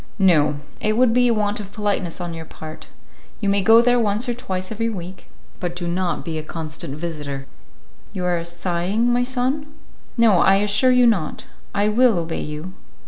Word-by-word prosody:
"No, 165 -7 +4 0.2
it 215 +1 0
would 245 -2 +4
be 245 0 +4
a 235 - +3
want 210 -1 0
of 200 -1 -8
politeness 200 -5 -2
on 175 -1 -4
your 165 0 -6
part. 155 0 -10 0.5
You 200 - 0
may 200 0 +2
go 225 +3 +6
there 245 0 +3
once 220 +2 0
or 240 - 0
twice 185 -5 -5
every 230 +1 -1
week, 185 -3 -7 0.3
but 175 -1 -3
do 175 -1 -3
not 175 0 -1
be 160 -2 -3
a - - -5
constant 155 -3 -5
visitor. 150 -5 -5 0.7
You 185 -4 -4
are 175 -2 0
sighing, 180 +7 0
my 245 - +2
son?" 260 +4 -1 0.5
"No, 220 -6 +5
I 195 - +5
assure 205 +5 +3
you 250 -1 +5
not. 200 -10 0 0.3
I 205 +1 +2
will 230 -1 +4
obey 165 -1 -2
you." 150 +5 -6
195 Hz, 190 wpm, -21 LUFS, 170-230 Hz, 0.7 s, go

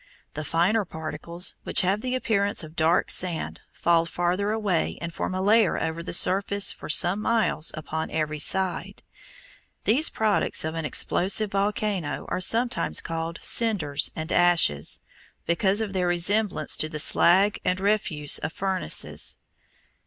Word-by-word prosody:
The 155 - -5
finer 180 +8 +1
particles, 170 +1 -4
which - - +4
have 195 +3 0
the 255 +1 -2
appearance 205 -6 0
of 155 +1 -12
dark 165 +2 +1
sand, 175 -3 0
fall 170 -1 +1
farther 175 +4 -1
away 205 -6 -1
and 170 0 -6
form 185 - -4
a 185 - -2
layer 215 -1 +3
over 165 +1 -3
the - - -7
surface 200 +3 +3
for - - -10
some 175 +6 +4
miles 220 -9 0
upon 160 0 -5
every 155 -1 -3
side. 185 +4 0 0.8
These 270 +9 +3
products 215 -6 0
of 160 - -3
an 165 -1 -4
explosive 195 +7 0
volcano 200 -4 -2
are - - -3
sometimes 235 +6 +1
called 165 0 -4
cinders 185 -12 +1
and 160 +1 -5
ashes, 170 - +2 0.4
because 190 +4 +1
of 210 -3 -4
their 180 -2 -1
resemblance 195 +4 +1
to 155 - -1
the 155 - -6
slag 185 +6 +3
and 180 0 -1
refuse 190 -7 0
of - - -5
furnaces. 190 - -1
180 Hz, 145 wpm, -25 LUFS, 165-205 Hz, 0.8 s, which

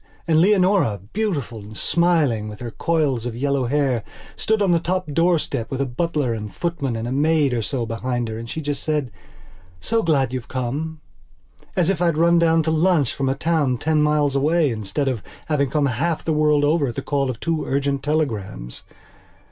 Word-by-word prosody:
And 160 -1 +4
Leonora, 185 - +3
beautiful 165 - -2
and 105 +1 -10
smiling, 155 -10 +2
with 105 - -9
her 120 -2 -6
coils 140 -6 0
of 115 - -5
yellow 140 +1 0
hair, 135 -3 +1 0.3
stood 220 0 0
on 200 -3 +2
the 170 - +4
top 185 +2 -1
doorstep, 165 -7 +1
with 135 - -4
a 140 - +1
butler 140 -1 -1
and 105 -2 -5
footman 145 - -2
and 115 +1 -3
a - - -3
maid 145 0 +2
or 120 - 0
so 120 +1 -2
behind 120 +1 -2
her. 110 0 -5
And 115 0 -8
she 160 - -4
just 145 -2 -3
said: 150 -6 -1 0.7
"So 225 - 0
glad 135 - +1
you've 125 -3 -4
come," 145 +6 -3 0.7
as 180 -1 +3
if 175 -3 -3
I'd 170 -3 +2
run 170 +1 +4
down 165 -1 +3
to 160 - 0
lunch 160 -4 +2
from 135 -1 -1
a 135 - 0
town 145 -4 +1
ten 155 +3 +1
miles 150 -2 +2
away, 150 +1 +2
instead 115 +6 -2
of 125 -6 -1 0.2
having 140 -3 +1
come 150 +2 +1
half 145 +6 -1
the 160 - +1
world 150 -1 +3
over 150 0 +2
at 120 - -5
the - - -4
call 140 -2 0
of 120 -3 -4
two 165 -1 -1
urgent 140 0 0
telegrams. 110 - -2
145 Hz, 195 wpm, -22 LUFS, 125-165 Hz, 0.7 s, And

